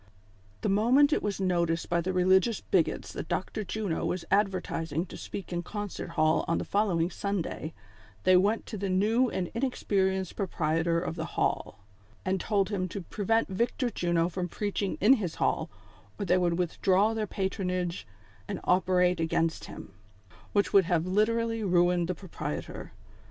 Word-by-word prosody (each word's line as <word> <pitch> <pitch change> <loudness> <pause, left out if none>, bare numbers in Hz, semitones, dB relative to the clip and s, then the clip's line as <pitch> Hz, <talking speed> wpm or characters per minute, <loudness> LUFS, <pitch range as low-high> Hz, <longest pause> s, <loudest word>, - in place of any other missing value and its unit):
The - - -1
moment 250 +9 +4
it - - +1
was 205 -2 -2
noticed 170 -3 0
by 170 0 +1
the 185 +3 -2
religious 185 +4 +3
bigots 175 -4 0
that - - -5
Dr. 215 +3 -2
Juno 200 -3 -2
was 180 -1 -2
advertising 180 -5 0
to - - -11
speak 190 - -7
in 175 - -1
Concert 205 0 -5
Hall 155 -1 +3
on 165 - +1
the - - -3
following 185 -5 +1
Sunday, 190 -5 -3 0.5
they 185 - +5
went 205 +5 +2
to 215 - -6
the 200 0 -2
new 220 +7 +3
and 185 -3 -3
inexperienced 190 -7 0
proprietor 165 -3 0
of 170 -1 -4
the 160 - -2
hall, 100 - -1 0.4
and 190 -1 0
told 200 -3 +1
him 190 -3 -1
to 195 +2 -6
prevent 220 +5 0
Victor 235 +5 -1
Juno 170 -4 +1
from 180 0 -3
preaching 200 +1 -2
in 215 +7 +6
his 175 -5 -3
hall, - - 0 0.5
or 200 - -1
they 180 - +3
would 175 -2 +1
withdraw 190 +4 +2
their 220 -1 -2
patronage 185 -3 -2 0.4
and - - -4
operate 180 -1 +3
acfainst 165 0 0
him, 95 - -10 0.6
which 205 -1 +1
would 195 -2 +6
have 170 -1 +1
literally 225 +3 +1
ruined 175 -2 +3
the 180 - -2
proprietor. 190 0 -6
185 Hz, 160 wpm, -29 LUFS, 175-205 Hz, 0.6 s, in